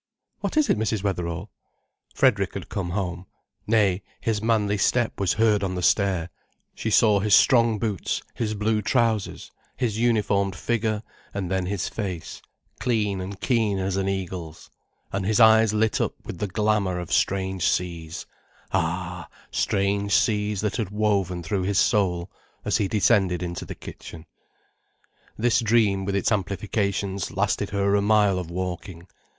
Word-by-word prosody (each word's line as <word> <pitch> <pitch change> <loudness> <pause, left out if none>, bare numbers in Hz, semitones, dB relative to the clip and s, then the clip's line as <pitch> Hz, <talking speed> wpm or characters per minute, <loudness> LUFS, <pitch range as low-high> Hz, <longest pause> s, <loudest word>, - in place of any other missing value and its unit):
"What - - -3
is 305 - +4
it, - - +2
Mrs. 110 -2 -1
Wetherall?" 90 -1 -3 0.6
Frederick - - +2
had - - -6
come 95 -3 -3
home. 90 -1 -3 0.4
Nay, 105 -4 +3 0.2
his 110 -2 -1
manly 105 -2 +1
step 120 +3 +1
was 95 -4 +2
heard 110 -2 +2
on 95 -1 -2
the 90 - -3
stair, 95 -5 +2 0.4
she 110 - -3
saw 105 -1 +4
his 105 0 +4
strong 115 -3 +4
boots, 105 -4 -2
his 110 -2 -2
blue 105 +1 0
trousers, 110 -1 0 0.3
his 115 -4 -1
uniformed 105 -5 +1
figure, 110 0 -1 0.3
and 95 -3 -3
then 95 -1 0
his 100 -1 -2
face, 90 -7 -5 0.4
clean 105 -6 0
and 95 +1 -7
keen 110 -6 +1
as 95 0 -1
an 95 0 0
eagle's, 90 -4 -5 0.4
and 95 0 -2
his 105 +3 +1
eyes 110 -1 +6
lit 110 0 +1
up - - -1
with 85 - -7
the 105 - -1
glamour 105 -2 0
of 90 -2 -4
strange 95 -1 +1
seas, 85 -2 -3 0.5
ah, 90 0 -2 0.2
strange 100 0 0
seas 105 -2 +1
that 105 +1 -1
had 110 -6 -2
woven 100 -4 0
through 95 +4 -1
his 95 +1 0
soul, 90 -4 +1 0.3
as - - +2
he 100 - 0
descended 95 -3 +2
into 85 -2 -5
the - - -7
kitchen. 80 0 -10 1.1
This 120 +1 +2
dream, 110 -4 +2
with 100 0 -1
its 100 - +1
amplifications, 100 -1 -1
lasted - - -1
her 100 0 +1
a 100 - +3
mile 105 -2 +3
of 90 -2 -6
walking. 90 0 -5
100 Hz, 155 wpm, -24 LUFS, 95-110 Hz, 1.1 s, eyes